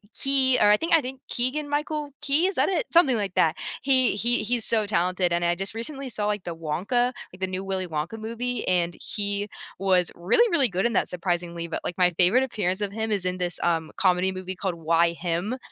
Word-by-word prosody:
Key 265 -1 +2
or 205 - +5
I 210 - +5
think 330 - -2
I 320 - +3
think 260 +1 -7
Keegan 275 +5 -1
Michael 295 0 -3
Key, 295 +6 +1
is 385 - -3
that - - +1
it? 355 -5 -1
Something 275 -9 +4
like 200 -3 -3
that. 160 -1 +2 0.3
He 260 -5 +3
he 240 +3 +1
he's 235 0 +5
so 220 -2 +5
talented, 180 -3 0
and 175 0 0
I 170 - +2
just 195 +4 -1
recently 270 +4 -4
saw, 210 -2 +1
like, 210 -2 -2
the 170 - -5
Wonka 180 +10 -1 0.3
like, 180 - -14
the 190 - -2
new 185 +1 -5
Willy 190 -1 -3
Wonka 160 +7 -5
movie, 235 +3 -4
and 175 -2 0 0.2
he 205 -1 0 0.3
was 185 -3 +2
really, 310 - +2
really 275 -7 +3
good 190 +3 -2
in 235 - 0
that - - +1
surprisingly, 175 -1 -3
but, 165 - -5
like, 175 - -5
my 180 -1 +4
favorite 185 +8 +4
appearance 205 -6 -2
of 200 - -2
him 220 +1 -4
is 200 -3 +2
in 180 0 -2
this, 175 -1 +4
um, 165 -2 -1
comedy 185 0 +1
movie 185 0 -7
called 185 -1 -4
Why 165 +1 +1
Him, 175 +8 -3
200 Hz, 225 wpm, -24 LUFS, 180-245 Hz, 0.3 s, or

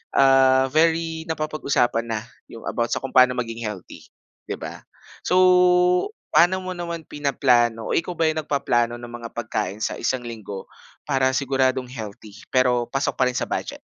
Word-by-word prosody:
ah, 135 -1 +5
very 165 +1 +1
napapag-usapan 140 -7 0
na 110 -1 -2 0.3
yung 115 - -11
about 120 0 -1
sa - - -1
kung 135 - -5
paano 125 -1 +5
maging 115 -2 -4
healthy, 100 -4 -9 0.4
'di - - -3
ba? - - -7 0.5
So, 180 - +2 1.0
pa'no 185 +2 +4
mo 185 - -4
naman 170 -2 -5
pinaplano 125 -6 +1
o - - +1
ikaw 170 +1 -1
ba 165 - 0
yung 155 0 -1
nagpaplano 120 -5 0
ng 120 0 -9
mga 115 -1 -7
pagkain 110 -3 -3
sa - - -2
1 125 +1 -1
linggo 105 -4 -7 0.4
para 135 -2 +1
siguradong 130 -2 0
healthy 110 -3 -8 0.2
pero 125 -2 +2
pasok 135 +2 -2
pa 130 - +4
rin 125 - -2
sa - - 0
budget? - - -4
130 Hz, 165 wpm, -23 LUFS, 120-150 Hz, 1.0 s, ah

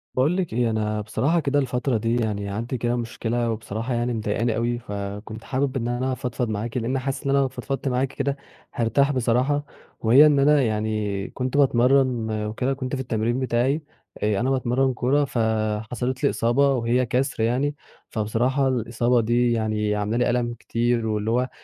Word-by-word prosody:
باقول 145 +8 +2
لِك 180 -8 -2
إيه، 120 0 +1
أنا 105 -1 -1
بصراحة 135 +10 +1
كده 145 -2 +1
الفترة 125 -2 0
دي 115 +2 0
يعني 105 -4 -1
عندي 115 +6 -3
كده 120 +1 0
مشكلة 120 0 -2
وبصراحة 110 +2 -4
يعني 120 +1 0
مضايقاني 110 +1 -1
أوي، 120 +1 -1
فكنت 105 +1 -6
حابب 135 0 -1
إن 120 -2 -2
أنا 125 +2 -1
أفضفض 125 -1 -3
معاكِ، 110 +3 -3
لأن 125 +3 -1
حاسس 135 +1 -3
إن 140 - -2
أنا 140 - +3
لو 135 - +2
فضفضت 135 +2 -4
معاكِ 130 +1 +1
كده، 140 0 -1 0.4
هارتاح 120 +5 +2
بصراحة 130 +3 +1 0.3
وهي 125 +7 +7
إن 150 -2 +4
أنا 145 +1 +5
يعني 105 -3 -1
كنت 130 +2 -3
باتمرّن 130 -3 +3
وكده 125 +5 -1
كنت 130 0 -4
في 130 - -3
التمرين 120 0 -1
بتاعي، 130 +4 +1 0.4
آآ 105 -2 +1
أنا 125 - 0
باتمرّن 130 0 +1
كورة 135 +4 +2
فحصلت 110 +2 -1
لي 140 - +5
إصابة 135 +5 +2
وهي 125 0 +1
كسر 125 -1 0
يعني، 130 +6 0 0.3
فبصراحة 120 +5 0
الإصابة 120 -1 +1
دي 120 +2 +2
يعني 110 -2 0
عاملة 105 +2 -1
لي 120 - +2
ألم 120 -1 0
كتير 120 0 -1
واللي 110 +1 -1
هو 125 +2 +1
120 Hz, 175 wpm, -24 LUFS, 110-130 Hz, 0.4 s, وهي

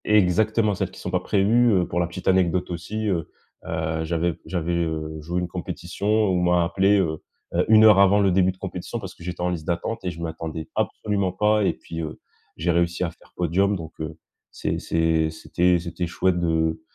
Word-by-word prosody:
Exactement, 105 +2 +3
celles 95 -1 -2
qui 95 - -14
sont 90 - -5
pas 90 - +2
prévues, 110 +6 +3
heu, 90 -3 +2
pour 85 - -2
la 85 - +1
petite 90 +2 -8
anecdote 90 -1 +2
aussi, 105 +6 -4
heu, 85 -5 -1 0.4
heu, 80 0 -2
j'avais 85 +1 0
j'avais, 85 -2 -2
heu, 80 -2 -2
joué 85 +4 -2
une 90 - -2
compétition 90 +3 -5
où 105 -4 +3
on - - 0
m'a 90 0 +3
appelé, 95 +4 +3
heu, 80 -4 -1 0.3
heu, - - +2
1 110 0 +7
heure 105 -3 +8
avant 100 +1 +6
le 100 -2 +3
début 95 0 +3
de 95 - -18
compétition 95 +3 -5
parce 95 -4 -8
que - - -14
j'étais 90 0 -5
en 90 - +1
liste 85 -3 -4
d'attente 90 +6 -2
et 90 - -1
je 85 -1 -8
m'attendais 80 -1 -5
absolument 100 -3 -1
pas 105 +3 +2
et 95 - +2
puis, 80 0 -7
heu, 80 -1 -6 0.4
j'ai 85 +2 +1
réussi 85 +1 +1
à 85 - -1
faire 85 - -23
podium. 95 +4 +1
Donc 80 -2 -7
heu, 80 +1 -5 0.3
c'est - - -3
c'est 80 -1 +1
c'était 90 +3 +1
c'était 85 +1 -4
chouette 90 +1 +1
de, 80 -1 0
90 Hz, 210 wpm, -24 LUFS, 85-95 Hz, 0.4 s, heure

